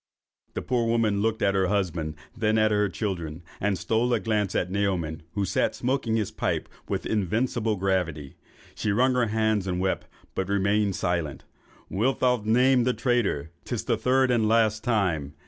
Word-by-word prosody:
The - - -3
poor 115 -2 +1
mother 110 -3 +2
looked 110 +2 0
at 100 - +3
her 95 -1 +2
husband, 85 -6 -1 0.2
and 115 - -16
then 110 0 +3
at 110 0 +3
her 105 -1 +2
children, 85 -4 -4 0.2
and 100 -1 0
stole 115 +6 0
a - - 0
glance 105 -4 -1
at 90 - 0
Naoman, 95 -6 -1
who 100 -1 0
sat - - 0
smoking 125 -3 0
his 110 -4 -1
pipe - - -2 0.2
with - - -2
invincible 110 +2 0
gravity. 90 -7 -1 0.4
She 105 - -1
wrung 130 +5 +3
her 125 -2 +2
hands 110 -2 +1
and 90 -1 -1
wept, 95 0 -1 0.3
but 95 0 -2
remained 100 0 +1
silent. 85 -6 -2 0.4
'Wilt 125 +7 0
thou 125 -2 +2
name 125 +3 +4
the 125 +1 +1
traitor? 110 - 0
'Tis - - -3
the - - +1
third 130 0 +2
and 115 -3 +2
last 110 -1 +2
time. 90 - 0
105 Hz, 180 wpm, -26 LUFS, 95-115 Hz, 0.4 s, name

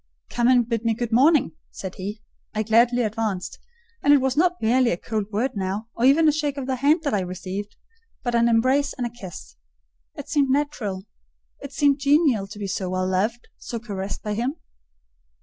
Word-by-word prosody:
"Come 240 0 +1
and 245 -2 +4
bid 230 -2 -2
me 230 -1 +1
good 240 0 -3
morning," 275 - +4 0.2
said 190 -1 -7
he. 205 +3 -7 0.3
I 215 - 0
gladly 235 +3 +3
advanced; 215 -4 -3 0.4
and 285 - +4
it 290 - +8
was 265 -1 0
not 355 +3 +2
merely 245 +2 +3
a 170 - 0
cold 215 0 -3
word 230 +6 0
now, 200 +3 -3
or 235 - 0
even 305 +4 +5
a - - +6
shake 295 -2 -2
of 275 - -3
the 260 0 -2
hand 300 +5 +3
that 285 - -1
I 205 - +2
received, 185 +3 -5 0.5
but 245 - -1
an 235 0 +3
embrace 255 +5 +2
and 250 - -3
a 240 - -4
kiss. 175 - -10 0.6
It - - -8
seemed 280 -3 +1
natural: 260 -9 -1 0.6
it 280 - -8
seemed 285 0 +2
genial 280 -8 +3
to 205 +1 -11
be 205 - -4
so 190 -1 -3
well 185 0 -1
loved, 210 +6 -1
so 235 - -5
caressed 200 -4 -6
by 210 - -2
him. 245 +7 -2
235 Hz, 200 wpm, -23 LUFS, 205-270 Hz, 0.6 s, it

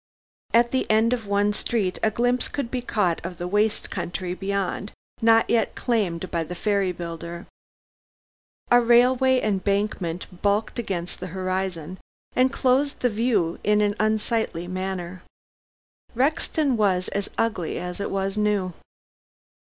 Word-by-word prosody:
At 235 +1 +4
the 260 - 0
end 220 +2 +4
of 230 -4 -3
one 205 +1 +2
street 205 -4 -1
a 220 - +3
glimpse 245 +3 +1
could 265 -4 -4
be 255 - -1
caught 205 -8 0
of 175 +1 -6
the 175 - -4
waste 210 +3 +1
country 180 0 -3
beyond, 200 +1 -2 0.3
not 225 0 +5
yet 230 -2 +1
claimed 190 -8 -1
by 170 -2 0
the 180 +3 -7
ferry 200 -1 +1
builder. 170 0 -6 1.3
A 245 0 +7
railway 250 +2 +4
embankment 195 -4 -1
bulked 210 +3 +1
against 180 -6 -3
the 185 - -5
horizon, 185 -2 -3 0.4
and 255 +1 +4
closed 275 +1 +1
the 245 - +2
view 215 -7 +1
in 210 0 +3
an 205 -1 +2
unsightly 215 -4 0
manner. 185 -1 -4 0.9
Rexton 280 0 +1
was 185 -4 +2
as 200 0 -3
ugly 215 -8 -1
as 180 +1 -5
it 200 - -2
was 195 +1 -2
new. 205 -4 +1
205 Hz, 140 wpm, -24 LUFS, 185-230 Hz, 1.3 s, A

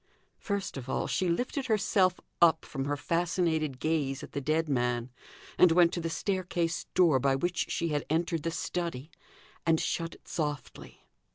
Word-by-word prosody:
First 200 -6 -3
of 130 0 -7
all - - 0
she 185 - 0
lifted 255 - -1
herself 195 -4 +2 0.2
up 165 -2 +5
from 135 -2 -4
her 145 +1 -1
fascinated 165 -3 0
gaze 145 -4 -1
at - - -9
the 140 - -3
dead 155 +3 +1
man, 125 -2 0 0.5
and 180 - +7
went 170 0 +5
to 175 - -2
the 165 - -2
staircase 175 -2 -1
door, 165 -7 +5
by 135 +1 +2
which 175 +5 -1
she 170 - -1
had 145 -2 0
entered 165 +1 0
the 165 - -1
study, 165 -4 -3 0.5
and 165 -1 +3
shut 165 -1 -2
it - - -22
softly. 150 -5 -5
165 Hz, 170 wpm, -30 LUFS, 145-175 Hz, 0.5 s, and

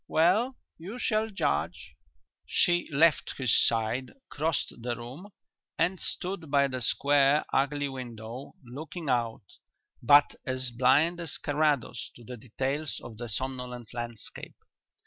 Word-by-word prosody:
Well, 210 +11 +3 0.2
you 195 +9 -7
shall 220 -2 0
judge." 80 - -2 0.5
She 175 0 +2
left 155 +2 +3
his 130 -5 +3
side, 115 +3 +2 0.2
crossed 155 +1 -1
the 120 0 -2
room, 125 - -9 0.5
and 180 +2 +1
stood 180 -4 -3
by 140 -1 +3
the 130 -1 -4
square, 140 +3 +4
ugly 145 +1 +1
window, 120 -1 -8
looking 150 +5 -7
out, 115 -3 0 0.6
but 145 +4 +6
as 130 -1 -2
blind 145 +8 +3
as 165 -4 -3
Carrados 145 -5 0
to 120 - -14
the 125 +2 -7
details 135 +6 -3
of 110 - -9
the 120 0 -6
somnolent 125 0 -5
landscape. 120 -2 -7
135 Hz, 125 wpm, -29 LUFS, 120-155 Hz, 0.6 s, but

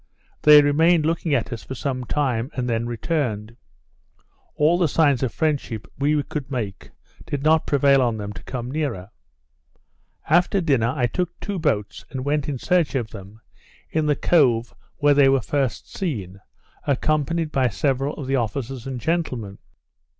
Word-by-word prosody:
They 150 -1 +8
remained 160 +3 +3
looking 165 -2 0
at 125 -1 -1
us 115 - -6
for 130 - -7
some 130 -1 -3
time, 130 -3 -1
and 125 -1 -2
then 115 0 -1
returned; 115 -4 -2 1.0
all 160 +4 +3
the 175 - +3
signs 145 -4 +2
of 130 -4 0
friendship 135 -6 -2
we 145 +1 +2
could 140 -1 -5
make 110 -8 -5 0.4
did 140 -1 -3
not 160 +1 +3
prevail 140 -1 +4
on 120 -3 +1
them 105 -1 -5
to - - -10
come 125 -1 -5
nearer. 130 -11 -3 1.2
After 175 +5 +3
dinner 135 -9 +2
I 125 -4 +1
took 175 +9 -3
two 200 -2 -4
boats 110 -11 -1
and 130 -1 -5
went 145 0 0
in 140 - -2
search 170 +1 +1
of 115 -4 -2
them, 100 +1 -11 0.5
in 155 -1 0
the 150 - +3
cove 125 -8 +2 0.2
where 145 -1 +4
they 140 -1 +5
were 135 0 +4
first 135 -4 -2
seen, 100 - -4 0.5
accompanied 155 +3 0
by 130 -3 +2
several 135 +5 -1
of 145 - -6
the 135 +1 0
officers 120 +2 -3
and 130 -2 -4
gentlemen. 125 - -2
135 Hz, 165 wpm, -23 LUFS, 120-150 Hz, 1.2 s, They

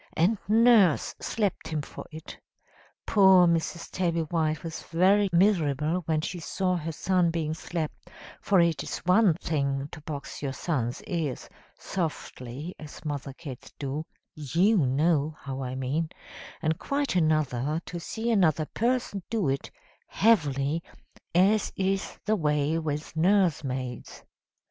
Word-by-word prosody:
And 185 +6 +3
Nurse 220 -5 +5
slapped 205 -7 -1
him 155 -2 -2
for - - -9
it. 155 0 -10 0.7
Poor 190 -3 +6
Mrs. 170 0 -1
Tabby 170 -3 0
White 155 -1 -1
was 165 -1 -5
very 195 +4 +3
miserable 170 -3 +2
when 155 -1 +1
she 175 +3 -4
saw 185 +2 -1
her 165 -1 -3
son 180 +2 +1
being 160 -2 -1
slapped: 160 -1 -5 0.3
for 195 -2 +3
it 170 -4 +3
is - - -4
one 185 -1 +5
thing 140 -4 -2
to 160 - -9
box 145 -2 -7
your 140 -2 -2
son's 130 -7 -2
ears 160 -8 -3 0.3
(softly, 155 -3 -5
as 155 0 -11
mother 145 -2 -4
cats 135 -2 -10
do; 145 +2 -3 0.3
you 170 - +2
know 150 +1 +2
how 135 -1 -5
I 130 0 -4
mean), 140 +5 -1 0.5
and 160 0 0
quite 280 -5 -1
another 155 -3 +1
to 175 - -6
see 225 +7 -3
another 165 -7 +3
person 235 0 -1
do 220 -10 0
it 135 0 -2 0.4
heavily, 150 -8 +2 0.5
as 200 +4 +4
is 195 0 -1
the 215 -1 +2
way 150 -2 +1
with 150 -1 -4
nursemaids. 155 - 0
160 Hz, 135 wpm, -27 LUFS, 145-185 Hz, 0.7 s, Poor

